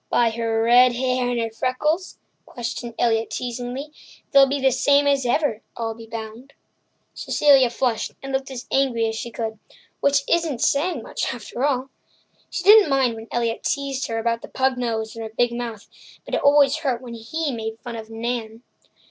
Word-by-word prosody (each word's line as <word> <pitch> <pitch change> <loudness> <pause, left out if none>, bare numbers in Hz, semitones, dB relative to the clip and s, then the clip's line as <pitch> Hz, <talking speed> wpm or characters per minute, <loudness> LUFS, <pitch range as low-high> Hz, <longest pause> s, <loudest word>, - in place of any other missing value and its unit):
"By 235 -1 +3
her 225 0 -1
red 245 +2 +6
hair 255 0 0
and 245 -1 -1
her 225 -1 -2
freckles?" 300 +10 -1 0.3
questioned 235 0 -5
Elliott 225 -2 +1
teasingly. 250 +4 -5 0.4
"They'll 275 -2 +7
be 280 +1 -1
the 265 0 +3
same 285 +3 +3
as 280 -3 +2
ever, 240 -4 +1 0.2
I'll 225 -1 -2
be 225 0 -12
bound." 225 +4 -8 0.6
Cecilia 275 -4 +4
flushed 235 -2 -1
and 270 - -5
looked 265 0 -1
as 255 -2 -7
angry 255 -4 +2
as 225 0 -2
she 235 - -5
could—which 235 +5 -3
isn't 325 -7 +1
saying 320 +6 +1
much, - - -3
after 245 - -6
all. 270 -2 0 0.6
She - - -4
didn't 420 -3 +8
mind 265 -3 +2
when 225 0 -9
Elliott 235 -1 -1
teased 275 -1 -2
her 225 - -3
about 230 0 -1
her - - -10
pug 265 0 +1
nose 225 -3 -3
and 225 - -6
her 220 0 -8
big 240 -1 +3
mouth, 235 -3 -6 0.4
but - - -10
it - - +1
always 285 0 +5
hurt 275 -6 -1
her 245 - -17
when 240 -2 -8
he 290 +7 -3
made 225 -2 -5
fun 240 0 -8
of 220 -1 -8
Nan. 225 0 -4
245 Hz, 185 wpm, -23 LUFS, 230-275 Hz, 0.6 s, didn't